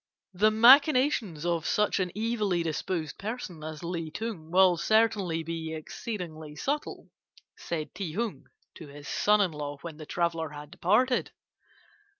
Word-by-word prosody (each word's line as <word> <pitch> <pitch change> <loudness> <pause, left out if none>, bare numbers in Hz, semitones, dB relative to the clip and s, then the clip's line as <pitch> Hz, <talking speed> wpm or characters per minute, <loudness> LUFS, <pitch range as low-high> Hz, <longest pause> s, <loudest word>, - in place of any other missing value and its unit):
"'The 210 +4 +4
machinations 250 - +5
of 170 -2 0
such 210 -1 +1
an 180 -2 -1
evilly 210 -6 0
disposed 160 0 -3
person 200 -7 -6
as 155 +1 -7
Li 170 -2 -3
Ting 185 -3 -6
will 185 0 +5
certainly 205 -5 +2
be 160 0 -4
exceedingly 160 -3 -6
subtle,' 285 - -3 0.4
said 160 -3 -5
Ti 180 -6 -5
Hung 225 +2 -3 0.3
to 160 - -11
his 145 0 -11
son 210 0 +3
in 190 -4 +2
law 145 -1 -5
when 165 -3 -7
the 155 -1 -10
traveller 165 -2 -1
had 145 0 -10
departed. 245 +8 +2
175 Hz, 145 wpm, -28 LUFS, 160-215 Hz, 0.4 s, machinations